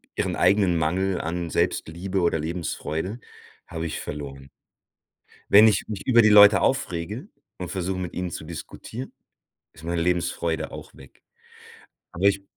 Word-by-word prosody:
ihren - - -1
eigenen 90 -1 +3
Mangel 90 +4 0
an 85 0 -3
Selbstliebe 90 +6 -1
oder 85 -1 +2
Lebensfreude, 85 +5 -4 0.5
habe 80 -1 -5
ich - - -5
verloren. 70 -2 -7 1.0
Wenn 105 +2 +8
ich 100 -3 +1
mich 105 -3 -6
über 120 -3 +6
die 110 - +5
Leute 105 -1 +8
aufrege 105 - -2 0.3
und 90 -2 -6
versuche, 95 0 -3
mit 90 -2 -5
ihnen 90 -1 -3
zu 80 - -7
diskutieren, 110 - -8 0.6
ist 75 - -15
meine 85 0 -1
Lebensfreude 85 -2 -1
auch - - -10
weg. 65 - -17 0.9
Aber 90 +4 -3
ich 100 -1 +3
90 Hz, 145 wpm, -24 LUFS, 80-100 Hz, 1.0 s, Wenn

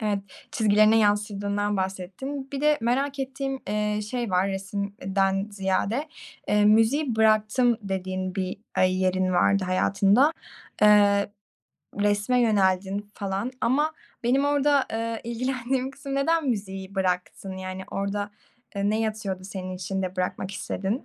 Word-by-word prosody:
Evet. 210 -2 0 0.3
Çizgilerine 215 0 +4
yansıdığından 205 -1 +1
bahsettin. 195 +9 -4
Bir 275 - -3
de 300 0 +3
merak 270 +4 0
ettiğim, 270 0 -3
eee, 210 0 0
şey 240 -4 -2
var 185 +2 +2
resim 195 +1 -3
eee, 200 -1 -8
den 195 +1 +2
ziyade. 200 +8 -1 0.4
Eee, 210 0 +3
müziği 225 +5 +3
bıraktım 220 +2 +3
dediğin 185 -1 -3
bir, 185 -1 -2 0.2
aaa, - - +2
yerin 185 0 +2
vardı 190 +2 +3
hayatında, 200 - +3 0.5
eee, 205 -1 +5 0.7
resme 205 +4 +2
yöneldin 200 -2 +1
falan 200 +4 -3
ama 295 +6 +2 0.3
benim 265 +4 +2
orada, 285 -1 +3
ııı, 230 0 -2
ilgilendiğim 255 +2 -2
kısım, 275 0 -7
neden 300 +1 +1
müziği 195 -3 -4
bıraktın, 185 0 -2
yani, 185 0 -6
orada, 200 +1 -2 0.5
eee, 200 +1 +1
ne 215 +1 0
yatıyordu 210 -4 -3
senin 185 -1 -6
içinde 185 0 -3
bırakmak 185 +1 -2
istedin? 195 +4 -3
205 Hz, 130 wpm, -25 LUFS, 190-240 Hz, 0.7 s, eee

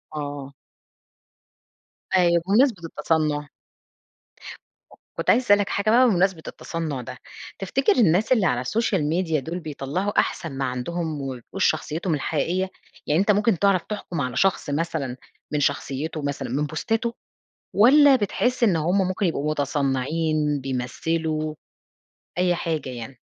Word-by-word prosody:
آه. 145 -2 -5 1.6
أيوه 170 -2 +4
وبمناسبة 210 -1 +3
التصنع 155 -3 -1 1.7
كنت - - -1
عايزة 255 - +4
أسألك 205 -2 +4
حاجة 200 +2 0
بقى 250 +3 +6
بمناسبة 185 -3 +1
التصنع 160 -6 -4
ده. 120 - -8 0.4
تفتكر 250 +8 +1
الناس 210 0 +3
اللي 220 -7 +4
على 125 -6 +1
الsocial 215 - 0
media 160 +1 0
دول 165 +7 -5
بيطلعوا 155 +6 -2
أحسن 165 - -1
ما 135 - 0
عندهم 150 +5 -3
وما 135 -1 -4
بيبقوش 155 +10 -3
شخصيتهم 160 +3 0
الحقيقيّة؟ 165 +6 -1 0.4
يعني 150 +3 +2
أنت 205 +1 +3
ممكن 205 -2 +2
تعرف 195 -3 +3
تحكم 190 -6 -4
على 125 -2 -3
شخص 195 -5 +1
مثلًا 145 -4 -2 0.4
من 150 - +1
شخصيته 145 +3 -2
مثلًا 140 -1 -3
من 140 +5 0
بوستاته 225 - -1 0.6
والّا 275 +6 +7
بتحس 245 +3 0
إن 200 -7 +4
هم 165 +4 +1
ممكن 185 +2 -1
يبقوا 150 -3 0
متصنعين 150 +1 0
بيمثلوا؟ 155 +5 -2 0.8
أي 180 0 +2
حاجة 160 -5 -3
يعني. 125 +1 -8
165 Hz, 130 wpm, -24 LUFS, 145-195 Hz, 1.7 s, والّا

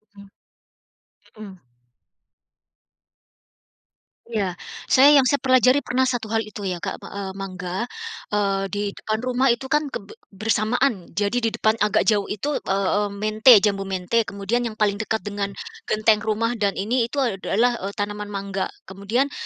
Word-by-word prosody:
Mmm. 200 0 -13 1.1
Mhm. 195 -3 -10 2.7
Iya. 200 -6 -2 0.3
Saya 270 +2 +7
yang - - -1
saya 285 - +2
pelajari 255 0 +4
pernah 260 -1 0
satu 245 -3 -1
hal 225 0 +1
itu 205 -1 -7
ya, 180 -2 -4
Kak, - - -4
me - - -11
a 200 0 -6
mangga, 190 +2 -5 0.5
eee, 195 -1 +1
di 205 +2 -3
depan 215 +2 -3
rumah 255 +1 +1
itu 265 +2 0
kan 300 -1 +2
keb 200 -6 -7 0.2
bersamaan 220 0 0
jadi 205 +5 0
di 230 - 0
depan 220 +1 +1
agak 210 -1 +2
jauh 205 -3 +2
itu, 280 +8 -2
eee 195 -1 -1 0.2
eee, - - -7
mente 215 +4 +6
jambu 195 -2 0
mente 195 +4 0
kemudian 220 +5 -1
yang 220 - -7
paling 205 -1 +1
dekat 220 0 -2
dengan 200 -1 -3 0.4
genteng 215 0 +3
rumah 220 +2 0
dan 200 -2 +1
ini 230 +4 0
itu 275 +3 -1
a 205 -6 -2
adalah 235 +6 +2 0.2
tanaman 205 0 -3
mangga. 195 -1 -3 0.2
Kemudian 215 +9 -1
215 Hz, 155 wpm, -23 LUFS, 200-240 Hz, 2.7 s, Saya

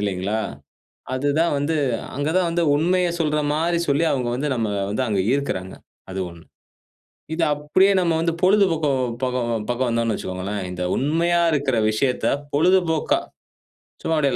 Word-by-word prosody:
இல்லைங்களா? 100 +1 -1 0.8
அதுதான் 145 +5 +1
வந்து 145 +3 0 0.4
அங்க 145 +2 -1
தான் 180 -2 +2
வந்து, 170 +1 0
உண்மைய 180 +4 +2
சொல்றா 150 -2 +1
மாரி 170 +2 +1
சொல்லி 140 +3 +2
அவங்க 125 -3 -1
வந்து 145 +4 -2
நம்மள 110 -4 -1
வந்து 110 +6 -1
அங்க 105 -3 0
ஈர்க்குறாங்க. 95 -10 -2 0.4
அது 95 - -4
ஒண்ணு. 85 -1 -14 0.9
இது 175 - -1
அப்படியே 150 +7 +3
நம்ம 170 -2 +1
வந்து 165 0 0
பொழுதுபோக்கோம் 165 -9 +3 0.2
பக்கம் 120 -4 -1
பக்கம் 125 +1 0
வந்தோம் 115 -1 0
வைச்சுக்கொங்களேன், 95 +2 -4
இந்த 90 0 -5
உண்மையா 170 +5 +2
இருக்குற 135 -5 +1
விஷயத்த 125 +4 0 0.3
பொழுதுபோக்கா, 165 0 +2 0.8
சும்மா 165 - +1
அப்படியே 140 -4 +2
145 Hz, 140 wpm, -22 LUFS, 115-165 Hz, 0.9 s, அப்படியே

